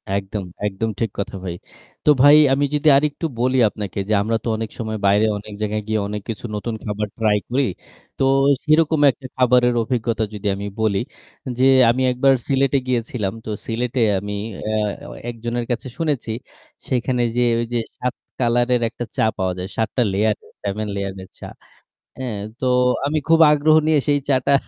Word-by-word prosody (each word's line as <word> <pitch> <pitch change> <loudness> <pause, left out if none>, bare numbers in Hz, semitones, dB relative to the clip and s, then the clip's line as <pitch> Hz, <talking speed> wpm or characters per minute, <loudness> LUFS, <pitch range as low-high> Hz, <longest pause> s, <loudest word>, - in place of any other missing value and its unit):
একদম, 100 +1 -3 0.2
একদম 105 +3 -2
ঠিক 115 -3 -1
কথা 100 - -3
ভাই। 85 -2 -4 0.5
তো - - +4
ভাই 145 +1 +8 0.2
আমি 145 +1 +2
যদি 150 +1 0
আরেকটু 150 +3 -1
বলি 130 +2 +2
আপনাকে 100 -2 -6
যে 110 - +2
আমরা 115 +2 0
তো - - -5
অনেক 110 -1 -4
সময় 110 -1 -3
বাইরে 100 +2 +4
অনেক 105 +1 -9
জায়গায় 105 0 -1
গিয়ে 110 0 0
অনেক 105 0 -4
কিছু 115 +1 -5
নতুন 110 +2 -3
খাবার 105 0 -2
try 110 -2 +2
করি। 135 +3 +1 0.5
তো - - 0 0.4
সেরকম 155 0 +3
একটা 130 +1 -11
খাবারের 125 -1 +4
অভিজ্ঞতা 115 -1 -1
যদি 105 0 -4
আমি 100 +1 -5
বলি 100 -3 +2 0.6
যে 130 - +4 0.2
আমি 125 +3 +1
একবার 135 +2 +3
সিলেটে 135 0 +2
গিয়েছিলাম। 115 -5 -1
তো - - -6 0.2
সিলেটে 120 +2 -1 0.2
আমি 105 +2 -5 0.3
অ্যা 110 0 -1 0.3
অ - - -9
অ্যা - - -10
একজনের 120 +1 -3
কাছে 120 - -3
শুনেছি 145 -8 -1 0.6
সেখানে 125 -1 0
যে 125 - +2 0.2
ওই 120 - -1
যে 120 - +2 0.2
৭ 125 0 -1 0.3
color-এর 120 0 +2
একটা 120 +1 -6
চা - - +2
পাওয়া 95 -2 0
যায়। 90 +1 -4
৭ 110 -2 +1
টা - - +4
layer, 105 +3 +2 0.3
7 105 +1 -2
layer-এর 95 -1 -5
চা। - - -8 0.7
হ্যাঁ, 120 -6 -4 0.2
তো 130 - -2 0.4
আমি 155 +2 0
খুব 165 0 +5
আগ্রহ 150 +1 +4
নিয়ে 155 -1 +4
সেই 145 0 +4
চাটটা 135 0 +2
115 Hz, 180 wpm, -21 LUFS, 105-130 Hz, 0.7 s, ভাই